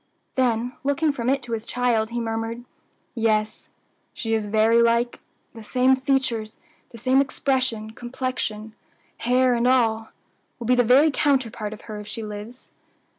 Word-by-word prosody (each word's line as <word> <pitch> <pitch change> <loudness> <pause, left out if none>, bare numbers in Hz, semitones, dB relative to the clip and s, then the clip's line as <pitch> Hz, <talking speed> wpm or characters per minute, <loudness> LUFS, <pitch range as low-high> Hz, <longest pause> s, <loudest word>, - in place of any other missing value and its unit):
Then, 245 -1 0
looking 285 +3 +1
from 250 -3 -2
it 275 -1 +1
to 240 - -8
his 225 -1 -2
child, 235 -2 0
he 240 0 -3
murmured, 225 +1 -3 0.5
"Yes, 215 -3 0 0.5
she 225 -2 -2
is 220 -2 0
very 220 +2 +4
like 235 +1 +2 0.3
the 230 - -10
same 255 +4 +3
features, 260 -5 -1 0.3
the 235 - -12
same 260 +4 +3
expression, 260 -5 -1
complexion, 240 -3 -4 0.4
hair 250 +1 +2
and 240 +1 +1
all 225 -3 +2 0.5
will 235 - -7
be 250 - +3
the 245 0 +4
very 270 +7 +5
counterpart 255 -8 0
of 215 - -9
her 215 -2 -7
if 210 - -9
she 220 +2 -5
lives." 210 +4 -9
235 Hz, 155 wpm, -24 LUFS, 220-255 Hz, 0.5 s, very